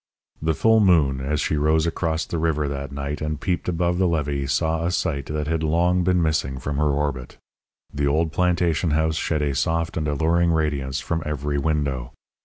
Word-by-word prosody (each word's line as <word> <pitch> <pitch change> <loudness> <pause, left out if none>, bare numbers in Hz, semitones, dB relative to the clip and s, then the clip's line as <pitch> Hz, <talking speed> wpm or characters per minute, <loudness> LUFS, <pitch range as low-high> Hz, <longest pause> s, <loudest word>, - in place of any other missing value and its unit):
The 80 0 0
full 110 +5 +4
moon, 80 -10 +3
as 75 +2 -1
she 75 - 0
rose 80 +2 +2
across 80 -1 -1
the 85 - -3
river 75 -2 0
that 70 -1 -4
night 70 +1 -4
and 75 -1 -2
peeped 90 +3 -2
above 85 +1 0
the 95 - +3
levee 70 -4 -1
saw 80 +4 0
a 85 - +1
sight 80 -6 -1
that 75 0 -2
had 80 +1 -1
long 85 +3 +2
been 90 -1 +2
missing 75 -4 0
from 70 +2 -4
her 75 0 +2
orbit. 70 -3 -2 0.6
The 70 0 0
old 80 +3 +1
plantation 85 -1 +1
house 80 0 +1
shed 75 -2 -1
a 70 -1 0
soft 80 +5 -1
and 75 -2 -1
alluring 85 +4 +2
radiance 70 -4 -1
from 80 +1 -2
every 75 -1 -2
window. 70 -4 -1
75 Hz, 195 wpm, -23 LUFS, 70-85 Hz, 0.6 s, full